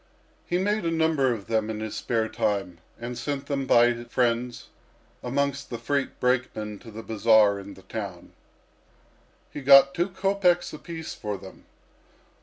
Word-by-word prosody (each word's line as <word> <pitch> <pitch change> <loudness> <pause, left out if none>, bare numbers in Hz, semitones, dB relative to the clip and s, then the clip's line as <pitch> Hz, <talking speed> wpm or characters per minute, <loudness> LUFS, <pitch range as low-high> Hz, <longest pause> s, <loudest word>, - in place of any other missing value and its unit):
He 175 - +1
made 205 +2 0
a 165 - 0
number 160 -5 +2
of 110 -5 -4
them 110 -1 0
in 110 -1 -4
his 110 -1 -5
spare 115 -2 -1
time, 100 -6 -2 0.2
and 120 +1 -5
sent 140 +1 -3
them 140 -2 -2
by 120 +1 +6
his 120 0 -9
friends 120 0 0 0.5
amongst 140 +2 -1
the 120 - -4
freight 140 +4 -2
brakemen 120 -5 -1
to 115 - -12
the 110 +1 -8
bazaar 110 -1 +4
in 100 0 -10
the 95 - -16
town. 100 -6 -7 1.2
He 145 - -5
got 140 0 +7
two 175 +3 0
kopeks 190 -2 +1
apiece 160 +1 -7
for 105 -1 -4
them. 95 0 -13
120 Hz, 160 wpm, -26 LUFS, 110-140 Hz, 1.2 s, got